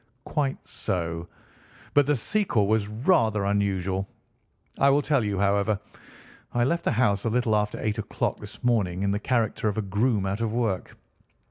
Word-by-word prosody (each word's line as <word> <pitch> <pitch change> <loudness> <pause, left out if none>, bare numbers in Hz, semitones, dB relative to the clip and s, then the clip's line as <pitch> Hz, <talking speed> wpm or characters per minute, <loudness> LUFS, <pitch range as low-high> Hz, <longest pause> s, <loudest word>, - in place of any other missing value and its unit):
"Quite 140 -3 -1
so; 85 -2 -3 0.7
but 145 -1 +4
the 150 - +3
sequel 130 - +1
was 105 0 +1
rather 110 - +2
unusual. 100 -1 0 0.7
I 140 - +5
will 145 +1 +3
tell 140 -6 +2
you, 100 -2 -1
however. 100 +1 +2 0.8
I 120 - +3
left 170 +7 0
the - - +2
house 105 -4 +2
a - - +2
little 115 -1 +1
after 105 0 0
eight 110 0 -1
o'clock 110 - -2
this - - -11
morning 100 -7 +1
in 100 - +1
the 100 - 0
character 115 -2 0
of 105 - -1
a 110 - 0
groom 105 +1 +1
out 100 +3 -2
of 110 -1 -1
work. 115 -6 -2
105 Hz, 170 wpm, -26 LUFS, 100-120 Hz, 0.8 s, I